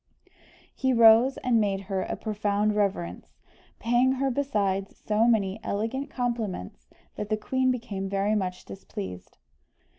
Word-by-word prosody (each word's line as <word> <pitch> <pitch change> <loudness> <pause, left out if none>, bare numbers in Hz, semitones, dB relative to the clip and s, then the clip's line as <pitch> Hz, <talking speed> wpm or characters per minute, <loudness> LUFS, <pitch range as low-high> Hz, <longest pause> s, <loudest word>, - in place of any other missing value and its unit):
He 260 -1 0
rose, 230 +3 +6
and 235 -3 +3
made 195 -2 0
her 195 -1 -2
a - - -3
profound 210 0 0
reverence, 140 - -2 0.4
paying 240 +3 +2
her 270 0 0
besides 205 -8 -1
so 215 +2 +3
many 210 -3 +1
elegant 230 +7 -2
compliments, 215 - -4 0.3
that 210 - -4
the 215 - +1
queen 260 +4 0
became 205 -6 -3
very 200 +2 +1
much 185 -3 -2
displeased. 95 - -8
210 Hz, 130 wpm, -27 LUFS, 195-240 Hz, 0.4 s, rose